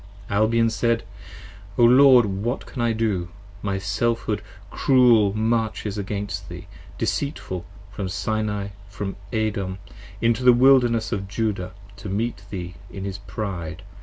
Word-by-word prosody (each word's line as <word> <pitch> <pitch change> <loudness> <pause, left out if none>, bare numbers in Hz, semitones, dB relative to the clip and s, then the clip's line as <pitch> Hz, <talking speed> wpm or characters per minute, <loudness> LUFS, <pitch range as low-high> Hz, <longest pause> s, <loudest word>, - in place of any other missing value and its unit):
Albion 115 +2 +3
said. 115 0 +1 0.7
O 120 - +4
Lord 125 0 +7
what 105 +6 -2
can 125 - -6
I 120 -1 +2
do: 105 -6 -1 0.3
my 100 -1 -1
Selfhood 105 +2 -1 0.3
cruel 120 -6 +5
Marches 110 -2 0
against 100 -1 -4
thee, - - -8 0.3
deceitful, 95 - -2 0.3
from 100 -1 -4
Sinai 105 0 -2
& 100 0 -20
from 100 -1 -5 0.2
Edom 105 -5 -1
10 - - -18 0.3
Into 115 +2 0
the 125 -1 +8
Wilderness 120 -3 +4
of 100 -4 -2
Judah 100 -3 -2 0.2
to 100 0 -7
meet 105 +1 -2
thee 90 -3 -5 0.2
in 95 - -7
his 100 0 -5
pride. 95 -4 -5
105 Hz, 135 wpm, -23 LUFS, 100-115 Hz, 0.7 s, the